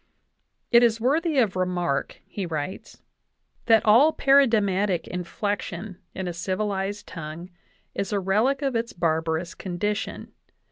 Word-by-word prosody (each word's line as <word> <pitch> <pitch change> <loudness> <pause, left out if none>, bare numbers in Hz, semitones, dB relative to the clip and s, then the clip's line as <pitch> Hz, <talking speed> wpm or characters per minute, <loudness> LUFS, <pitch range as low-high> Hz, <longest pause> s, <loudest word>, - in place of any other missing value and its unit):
"It 235 - +7
is 230 -2 +3
worthy 300 +6 +1
of 220 -8 +2
remark," 180 -5 -2
he 195 -3 -5
writes, 160 +2 -6 0.6
"that 225 -1 +5
all 240 +9 +6
paradigmatic 210 - +3
inflection 185 +1 -4 0.2
in 190 -1 -4
a 175 - -3
civilized 195 +3 -2
tongue 165 +2 -8 0.4
is 195 - -3
a 205 - +1
relic 220 +9 +1
of 270 -3 0
its 230 +1 -2
barbarous 160 0 -1
condition. 200 +3 -4
195 Hz, 125 wpm, -25 LUFS, 175-225 Hz, 0.6 s, It